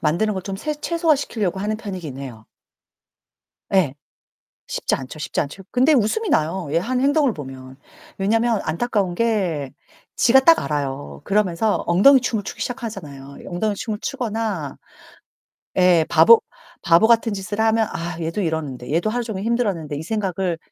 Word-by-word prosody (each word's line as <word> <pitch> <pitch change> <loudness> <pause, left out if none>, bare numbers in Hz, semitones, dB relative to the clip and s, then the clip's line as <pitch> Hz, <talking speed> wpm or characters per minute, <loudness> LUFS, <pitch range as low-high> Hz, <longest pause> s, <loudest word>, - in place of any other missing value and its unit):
만드는 175 +8 +1
걸 190 - -4
좀 195 -1 -4
새 300 +8 -3
최소화 330 +1 +1
시키려고 210 -9 -2
하는 210 +2 -1
편이긴 180 - -6
해요. 120 -5 -9 1.3
예. 180 -9 +3 0.7
쉽지 - - -1
않죠, 135 +3 -8
쉽지 155 - -3
않죠. 155 +6 -7
근데 260 +5 +4
웃음이 285 - +1
나요 165 +2 0
얘 - - +3
하는 250 +8 -1
행동을 285 -3 +3
보면. 130 -3 -9 0.4
왜냐하면 225 +3 +1
안타까운 190 +1 -1
게 180 - 0 0.5
지가 265 +3 +5
딱 330 +4 +6
알아요. 145 -2 -4
그러면서 205 0 +1
엉덩이 205 +11 +6
춤을 230 -4 -2
추기 - - -7
시작하잖아요. 150 - -6
엉덩이춤을 210 +3 -2
추거나 220 - -3 1.0
예, 180 -3 +5
바보 170 +8 +7 0.4
바보 170 +6 +5
같은 230 -1 +3
짓을 205 +2 -4
하면 220 0 +2
'아, 170 0 -5
얘도 165 +5 -2
이러는데 145 -7 -3
얘도 170 +6 +1
하루 240 +2 -2
종일 205 -4 -5
힘들었는데.' 200 -11 -1
이 145 - -5
생각을 190 -3 -2
195 Hz, 340 characters per minute, -21 LUFS, 160-225 Hz, 1.3 s, 바보